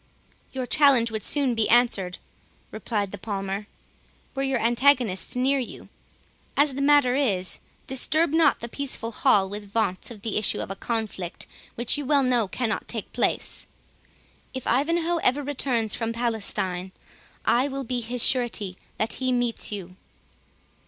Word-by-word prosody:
"Your 260 -1 -3
challenge 255 -4 +4
would 220 -1 -4
soon 280 -4 +2
be 225 -2 +1
answered," 215 -7 +3 0.5
replied 210 -3 -2
the 205 - -7
Palmer, 195 0 -4 0.7
"were 270 - -3
your 270 -1 +1
antagonist 240 -5 +3
near 270 +2 +2
you. 250 - -7 0.7
As 285 -1 +4
the 275 - -3
matter 280 -3 +4
is, 200 -10 +1 0.3
disturb 285 +5 +1
not 325 0 +4
the 235 - -4
peaceful 245 -3 -3
hall 200 -3 +3
with 205 +1 -7
vaunts 200 -4 -1
of 220 -4 -11
the 220 -2 0
issue 215 - 0
of - - -4
the 195 - -4
conflict, 215 -5 -3 0.3
which 240 +5 +1
you 290 - -4
well 285 -1 +4
know 245 -4 +2
cannot 225 +2 -2
take - - -6
place. - - -1 0.9
If 260 - -5
Ivanhoe 335 +7 +1
ever 290 -2 +1
returns 250 -6 0
from 230 -1 -2
Palestine, 200 -6 -1 0.5
I 250 +4 +3
will 275 -1 -4
be 245 0 -2
his 235 +1 -1
surety 225 -7 +2 0.2
that 220 - 0
he 255 -1 -1
meets 245 -3 -1
you." 185 -3 -6
235 Hz, 150 wpm, -25 LUFS, 210-270 Hz, 0.9 s, challenge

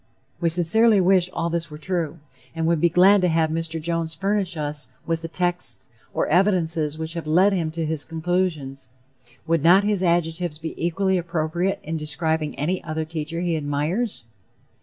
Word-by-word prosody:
We 170 - +1
sincerely 200 +6 +4
wish 185 -1 +3
all 170 -1 -2
this 170 0 -2
were 150 - -9
true, 170 -1 -3 0.4
and 165 0 -1
would 165 -2 +1
be 170 - +4
glad 190 +4 +5
to 180 - +3
have 160 -2 +1
Mr. 165 0 -2
Jones 165 0 -2
furnish 195 0 -1
us 150 -1 -4 0.2
with 165 -1 -1
the 165 - -5
texts 175 +1 0 0.2
or - - 0
evidences 165 -4 +2
which 160 0 -5
have 170 -2 -6
led 185 +6 +4
him 170 -4 -1
to 165 0 -3
his 155 -2 -2
conclusions. 160 -5 -2 0.6
Would 165 -1 +1
not 180 +4 +6
his 205 -2 +1
adjectives 170 -2 0
be 160 +1 -6
equally 190 +2 0
appropriate 170 +2 -1
in 160 +2 -3
describing 155 0 -1
any 160 +7 -2
other 155 0 -3
teacher 160 +1 -4
he 175 -2 0
admires? 155 - -2
165 Hz, 175 wpm, -23 LUFS, 160-180 Hz, 0.6 s, not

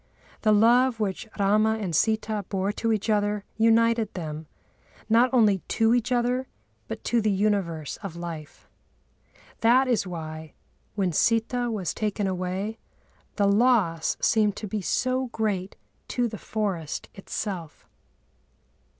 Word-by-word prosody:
The 215 - +3
love 235 +3 +4
which 210 +2 -2
Râma 215 +2 +2
and 190 -5 -3
Sitâ 215 +2 0
bore 195 0 0
to 225 +2 -1
each 215 -1 -1
other 205 -1 0
united 230 0 +3
them, 155 -3 -5 0.6
not 230 +3 +4
only 215 -6 +4 0.2
to 225 0 +4
each 245 +1 0
other, 250 +1 +1 0.4
but - - -6
to 235 -1 +1
the 215 - +1
universe 195 -7 0
of 195 -5 -7
life. 165 -3 -8 0.9
That 250 +4 +4
is 235 -6 +1
why, 160 -2 -7 0.4
when 190 -3 0
Sitâ 235 - +1
was 190 -7 -2
taken 210 -1 -2
away, 190 +4 -3 0.6
the 205 - +2
loss 200 -7 +2
seemed 210 -2 +2
to 210 - -6
be 210 +1 -3
so 255 +6 0
great 205 -5 -2 0.3
to 245 -1 0
the 220 -2 -7
forest 190 -8 -3
itself. 190 -4 -6
210 Hz, 135 wpm, -26 LUFS, 190-230 Hz, 0.9 s, love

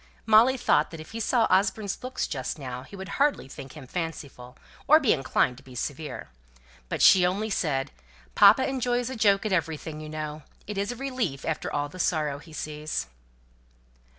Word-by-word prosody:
Molly 230 +4 +6
thought 155 -10 +2
that 165 - -9
if 155 - -10
he 230 - -5
saw 230 +1 +2
Osborne's 195 +2 +1
looks 255 0 -2
just 130 0 -4
then 130 -2 -6
he 200 - -12
would 190 -1 -7
hardly 290 - +2
think 135 0 -10
him 150 -3 -10
fanciful, 140 -6 -6 0.3
or 310 +2 +8
be 270 -8 +3
inclined 130 -3 +1
to 135 - -15
be 130 -2 -13
severe. 145 - -5 0.6
But - - -1
she 185 - +8
only 200 +5 0
said, 145 -8 -1 0.4
"Papa 265 - +6
enjoys 245 -2 -1
a - - -5
joke 205 -2 +3
at 210 - 0
everything, 160 -2 -2
you 155 - -8
know. 155 0 -5 0.2
It 205 -1 -4
is 200 +3 -1
a - - -6
relief 245 - -3
after 160 - -2
all 145 0 -1
the 185 +5 -12
sorrow 150 -5 0
he 160 +2 -15
sees." 150 0 -4
165 Hz, 185 wpm, -27 LUFS, 145-220 Hz, 0.6 s, or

